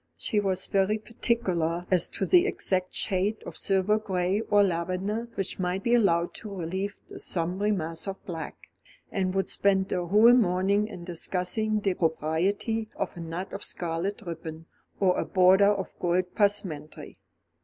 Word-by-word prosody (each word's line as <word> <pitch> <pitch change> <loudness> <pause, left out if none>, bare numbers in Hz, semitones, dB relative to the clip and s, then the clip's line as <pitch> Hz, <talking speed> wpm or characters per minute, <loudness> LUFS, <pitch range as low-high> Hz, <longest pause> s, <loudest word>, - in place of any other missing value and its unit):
She 210 - 0
was 190 -2 0
very 195 +2 +1
particular 185 -7 -1
as 180 -2 +4
to 195 - -2
the 360 - +5
exact 185 - 0
shade 195 +3 0
of - - -8
silver 195 +2 +2
gray 190 -1 0
or 205 -1 +5
lavender 190 +5 -2
which 195 0 -3
might 185 +1 -1
be 240 - +2
allowed 175 -7 +3
to 215 - -8
relieve 190 +1 -4
the - - -10
sombre 185 +4 -1
mass 165 -2 -3
of 195 0 -3
black; 165 -3 -6 0.6
and 190 -1 -1
would 195 -1 +1
spend 195 -1 +1
a 180 -1 -1
whole 215 +6 +7
morning 200 -2 +2
in 175 - -9
discussing 185 +5 -1
the 195 -2 +1
propriety 180 +7 -1
of - - -3
a - - -9
knot 170 +3 -5
of 200 - -5
scarlet 175 +6 -3
ribbon, 165 -2 -7 0.3
or 185 -2 +3
a - - +1
border 190 +2 +5
of 195 -2 -3
gold 180 +1 0
passementerie. 185 -8 -2
190 Hz, 160 wpm, -27 LUFS, 175-205 Hz, 0.6 s, whole